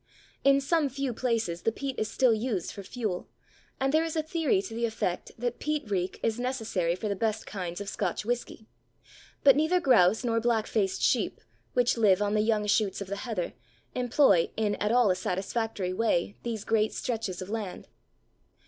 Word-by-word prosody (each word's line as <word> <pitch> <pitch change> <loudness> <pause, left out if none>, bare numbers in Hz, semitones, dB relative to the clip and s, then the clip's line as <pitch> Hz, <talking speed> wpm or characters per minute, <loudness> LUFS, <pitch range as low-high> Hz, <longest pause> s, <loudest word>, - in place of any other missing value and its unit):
In 275 0 +5
some 295 +1 +1
few 270 -1 -2
places 225 -8 -1
the 225 - +1
peat 275 +3 -4
is 220 - -1
still 255 -3 +3
used 220 -5 -2
for 200 - -8
fuel, 200 -2 -4 0.5
and 270 +1 +1
there 315 +1 +4
is 330 -1 -3
a 315 - +1
theory 315 - +1
to 215 - -7
the 235 +1 0
effect 215 -5 -2
that 245 +1 -3
peat 300 -8 -2
reek 185 -1 -1
is 225 +1 0
necessary 225 -9 -1
for 215 - -4
the 200 - -1
best 220 +2 -1
kinds 180 -3 -5
of 205 - -6
Scotch 205 - -2
whisky, 235 -2 -3 0.8
but 275 -2 +8
neither 315 +5 +3
grouse 220 - +4
nor 230 -2 +1
black 230 -2 +1
faced 200 -4 -1
sheep, - - +1 0.3
which 245 -1 +2
live 200 -5 +4
on 205 0 0
the 215 - +3
young 215 -1 +1
shoots 205 -1 +1
of 200 -2 -6
the 200 - -2
heather, 210 -6 -3 0.4
employ 245 - +3
in 215 -2 +1
at 210 +1 0
all 240 -4 +5
a - - +1
satisfactory 190 +1 -2
way 200 -2 +1
these 225 -3 -4
great 220 -1 +2
stretches 220 -7 -3
of 185 +2 -6
land. 215 -5 -5
225 Hz, 190 wpm, -28 LUFS, 200-250 Hz, 0.8 s, but